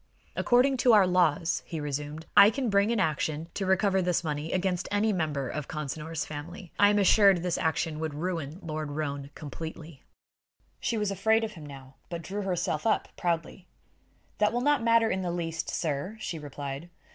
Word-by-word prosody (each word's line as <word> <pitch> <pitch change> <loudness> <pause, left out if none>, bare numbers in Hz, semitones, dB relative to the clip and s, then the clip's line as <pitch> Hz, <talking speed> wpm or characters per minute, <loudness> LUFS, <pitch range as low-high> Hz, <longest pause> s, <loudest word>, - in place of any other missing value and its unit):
"According 260 +2 +3
to 245 0 +5
our 205 -3 +7
laws," 175 -3 +2
he 165 - -6
resumed, 150 +2 -4
"I 200 +1 +9
can 245 -1 -2
bring 200 +2 +3
an 235 - +1
action 155 -1 -1
to 195 - -3
recover 190 0 +3
this 175 -1 0
money 150 0 -3
against 180 -1 -1
any 210 +1 +1
member 150 -6 -1
of 150 +2 -4
Consinor's 150 +1 -4
family. 165 +4 -8
I 205 - +7
am 205 - +2
assured 200 -1 +6
such 180 -2 0
an - - -2
action 160 -1 -1
would 155 -2 -3
ruin 165 -2 -3
Lord 155 -2 -4
Roane 140 -2 -3
completely." 160 0 -8 0.8
She 230 - -1
was 210 -2 0
afraid 220 +4 +2
of 220 - -3
him 160 -7 -10
now, 135 -1 -12
but 170 -1 -5
drew 195 +5 -4
herself 180 -1 -1
up 220 - +1
proudly. 170 +1 -2 0.7
"That 210 0 +3
will 240 +2 -1
not 290 0 +3
matter 230 0 +4
in 190 - -1
the 180 - -2
least, 165 -2 -3
sir," 160 +6 -2
she 170 -6 -4
replied. 145 +2 -6
170 Hz, 185 wpm, -28 LUFS, 150-200 Hz, 0.8 s, I